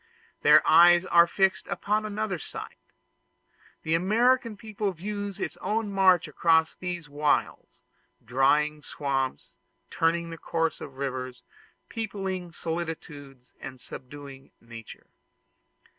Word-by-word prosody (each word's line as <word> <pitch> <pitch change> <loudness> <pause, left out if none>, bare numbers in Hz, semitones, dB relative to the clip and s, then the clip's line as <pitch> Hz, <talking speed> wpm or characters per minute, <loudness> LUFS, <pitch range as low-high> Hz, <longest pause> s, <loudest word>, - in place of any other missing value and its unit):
Their - - +6
eyes 175 +1 +7
are 170 -1 +5
fixed 190 -2 +1
upon 210 +4 -1
another 210 -3 -3
sight: - - -9 1.0
the 160 - -1
American 225 +6 +2
people 210 -2 -3
views 205 +2 -5
its - - -4
own 215 -1 -2
march 190 -4 +4
across 160 +1 +2
these 175 -3 -5
wilds 145 0 -1 0.4
drying 150 +5 +2
swamps, 135 -6 -3 0.4
turning 165 0 0
the 165 - -8
course 165 -1 -2
of 135 -1 -9
rivers, 130 -2 -5 0.4
peopling 195 -5 -4
solitudes, 150 -6 -7
and 130 -1 -8
subduing 135 +2 -11
nature. 115 -1 -12
165 Hz, 110 wpm, -27 LUFS, 140-195 Hz, 1.0 s, eyes